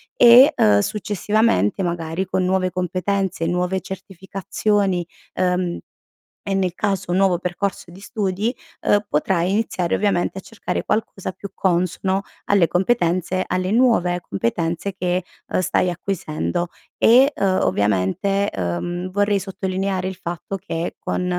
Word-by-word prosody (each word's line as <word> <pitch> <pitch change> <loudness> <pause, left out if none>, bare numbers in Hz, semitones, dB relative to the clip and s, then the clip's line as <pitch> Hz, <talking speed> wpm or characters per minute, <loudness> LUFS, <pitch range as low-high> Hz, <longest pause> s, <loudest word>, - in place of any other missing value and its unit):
e, 250 - +8
ehm, 105 -1 +4
successivamente 205 - +1
magari 170 +1 -2
con 185 0 -1
nuove 185 0 +1
competenze, 185 0 -1
nuove 180 +2 0
certificazioni, 190 0 -2 0.3
ehm, 180 -1 0 0.7
e 195 - 0
nel 185 -2 0
caso 195 -3 -1
un 180 - +1
nuovo 190 -3 +3
percorso 180 0 -3
di 180 - -13
studi, 205 +2 -2 0.3
uhm, 205 0 +3
potrai 170 +3 +1
iniziare 195 -4 0
ovviamente 195 -2 0
a 190 - -5
cercare 225 - -4
qualcosa 205 -3 -2
più 200 - -9
consono 190 +1 0 0.2
alle 195 -5 +4
competenze 185 -2 +1
alle 185 +1 -1
nuove 215 -7 +3
competenze, 165 - -2
che 180 -1 -1 0.4
stai 180 0 +1
acquisendo; 175 -1 -2 0.3
e, 260 +5 +6
uhm, 190 -1 +1
ovviamente, 105 - +1
uhm, 100 - -3
vorrei 205 +1 +1
sottolineare 190 0 -2
il 190 - -4
fatto 175 +3 -4
che 175 -3 -4
con, 180 - -2
185 Hz, 125 wpm, -21 LUFS, 175-200 Hz, 0.7 s, e